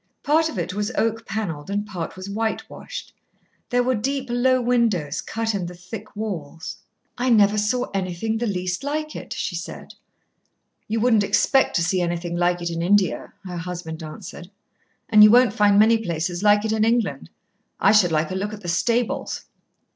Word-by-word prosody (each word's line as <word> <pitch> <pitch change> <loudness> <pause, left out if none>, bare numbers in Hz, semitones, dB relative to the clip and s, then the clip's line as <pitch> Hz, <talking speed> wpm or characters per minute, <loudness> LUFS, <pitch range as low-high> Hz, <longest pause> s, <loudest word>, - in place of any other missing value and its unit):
Part 315 +2 +3
of 235 - -7
it 175 +1 -2
was 205 +1 -2
oak 225 0 0
panelled 190 -7 -4
and 205 +1 -1
part 180 -5 -5
was 185 +1 -8
whitewashed. 220 +2 -4 0.6
There 245 0 +2
were 255 +1 +1
deep, 265 +3 -2
low 255 +1 +3
windows 235 - +1
cut 225 0 -2
in 190 -4 -2
the 180 - -8
thick 195 +5 -9
walls. 170 -7 -5 0.4
"I 255 +1 +1
never 210 -3 +5
saw 245 +4 0
anything 195 +4 -2
the 240 - -1
least 185 +2 -2
like 305 +2 -3
it," - - -8
she 195 - -3
said. 175 +3 -7 0.9
"You 225 +1 -1
wouldn't 225 -2 +4
expect 265 +6 +2
to 170 - +2
see 180 +2 +1
anything 175 0 -2
like 175 0 +1
it 170 - -2
in 165 0 -3
India," 190 0 +1
her 180 -1 -5
husband 170 -1 -6
answered. 170 +2 -9 0.6
"And 215 -1 +7
you 210 - +9
won't 245 +2 +5
find 205 -1 +4
many 225 +2 +5
places 175 -2 -3
like 205 0 +4
it 220 - 0
in 220 -1 +2
England. 220 - 0 0.5
I - - +5
should 205 -5 +5
like 155 +1 0
a - - -3
look 205 +3 -3
at 210 - -8
the 175 - -5
stables." 235 +8 0
205 Hz, 185 wpm, -23 LUFS, 175-225 Hz, 0.9 s, you